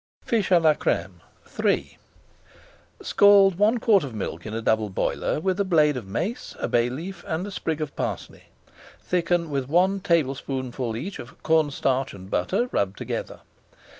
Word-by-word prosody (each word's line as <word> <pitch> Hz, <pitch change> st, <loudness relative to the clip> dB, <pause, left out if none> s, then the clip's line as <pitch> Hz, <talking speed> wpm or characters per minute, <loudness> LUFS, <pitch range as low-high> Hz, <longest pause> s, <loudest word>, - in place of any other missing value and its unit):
FISH 220 Hz, -4 st, 0 dB
À 180 Hz, -2 st, +6 dB
LA 155 Hz, -1 st, +6 dB
CRÈME 90 Hz, -, -2 dB, 0.4 s
III -, -, 0 dB, 1.0 s
Scald 200 Hz, -2 st, +5 dB
one 215 Hz, +4 st, +4 dB
quart 215 Hz, -6 st, +3 dB
of 130 Hz, -5 st, -6 dB
milk 105 Hz, -, -5 dB
in 105 Hz, -, -6 dB
a -, -, -1 dB
double 110 Hz, -1 st, +1 dB
boiler 95 Hz, -, -1 dB
with 190 Hz, +3 st, -1 dB
a -, -, +3 dB
blade 155 Hz, -6 st, +3 dB
of 120 Hz, -6 st, -6 dB
mace, 175 Hz, -, -4 dB
a -, -, -2 dB
bay 120 Hz, 0 st, +2 dB
leaf, 175 Hz, +9 st, -7 dB
and 160 Hz, +3 st, -2 dB
a 205 Hz, -, -7 dB
sprig 160 Hz, -4 st, -3 dB
of 150 Hz, -2 st, -4 dB
parsley. -, -, -5 dB, 0.5 s
Thicken 175 Hz, -2 st, 0 dB
with 135 Hz, -2 st, -2 dB
one 185 Hz, +5 st, +3 dB
tablespoonful 130 Hz, -, -1 dB
each 180 Hz, +11 st, -6 dB
of 120 Hz, -, -12 dB
corn 160 Hz, -2 st, +3 dB
starch 135 Hz, -3 st, -1 dB
and 95 Hz, 0 st, -12 dB
butter 90 Hz, -, 0 dB
rubbed 100 Hz, 0 st, -1 dB
together. -, -, -5 dB
155 Hz, 165 wpm, -24 LUFS, 125-185 Hz, 1.0 s, À